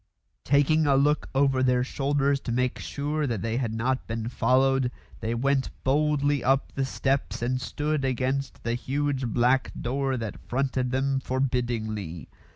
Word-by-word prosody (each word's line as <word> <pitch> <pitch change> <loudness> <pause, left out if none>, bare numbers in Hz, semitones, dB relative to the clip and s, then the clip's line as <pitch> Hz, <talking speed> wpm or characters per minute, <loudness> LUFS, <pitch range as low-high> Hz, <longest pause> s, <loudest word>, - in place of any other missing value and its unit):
Taking 145 +3 +3
a 140 - +4
look 145 +2 +2
over 135 -1 +3
their 125 -1 +3
shoulders 140 +1 +1
to 120 - -5
make 125 +1 0
sure 150 +1 -2
they 115 0 -1
had 120 -4 -1
not 130 +3 -1
been 115 0 -3
followed, 130 +1 +2 0.3
they 115 +1 -2
went 135 +2 +1
boldly 145 0 +2
up 135 +1 +1
the 135 - 0
steps 135 -2 -1
and 130 +1 0
stood 150 0 -2
against 130 +1 -1
the 115 - -1
huge 135 +1 -1
black 125 +3 +2
door 135 +2 -1
that 110 -3 -5
fronted 130 0 0
them 135 +1 +1
forbiddingly. 120 -9 -2
130 Hz, 150 wpm, -26 LUFS, 125-140 Hz, 0.3 s, a